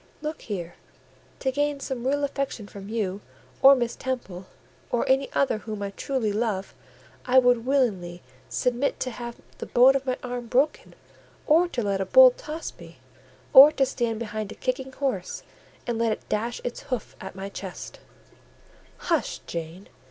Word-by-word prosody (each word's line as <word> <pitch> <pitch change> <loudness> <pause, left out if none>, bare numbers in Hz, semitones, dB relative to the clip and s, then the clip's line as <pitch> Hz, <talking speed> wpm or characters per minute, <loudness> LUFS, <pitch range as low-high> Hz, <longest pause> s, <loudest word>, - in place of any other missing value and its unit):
Look 305 +1 -4
here; 175 -5 -6 0.6
to 265 - +1
gain 290 +1 0
some 255 -2 -4
real 285 +1 +1
affection 275 -6 -3
from 200 0 -10
you, 205 -3 -2 0.4
or 275 +1 +9
Miss 240 -2 -2
Temple, 195 -8 -5 0.4
or 240 - 0
any 270 +1 +2
other 270 -6 +1
whom 215 -2 -6
I 200 - -3
truly 230 -1 -2
love, 210 -3 -2 0.5
I 255 +1 +3
would 245 -2 +4
willingly 195 -11 0 0.3
submit 250 +3 0
to 255 - -2
have 235 0 -7 0.2
the - - -6
bone 255 +3 +6
of 270 0 -2
my 255 - 0
arm 245 -1 -5
broken, 270 +6 0 0.5
or 335 +3 +4
to 250 -9 -3
let 200 -1 0
a - - 0
bull - - +8
toss 320 -8 -7
me, - - -13 0.6
or 280 +2 +11
to 270 - +2
stand 235 -3 -2
behind 215 -2 -5
a - - -8
kicking 260 +1 -3
horse, 260 -10 -3 0.4
and 235 -2 -2
let 230 -1 +2
it - - -10
dash 230 +3 -2
its 245 - -4
hoof 250 -5 -3
at 190 0 -8
my 195 0 -5
chest—" 190 -2 -8 1.1
"Hush, 335 -4 0
Jane! 170 +3 -6
240 Hz, 165 wpm, -25 LUFS, 205-270 Hz, 1.1 s, or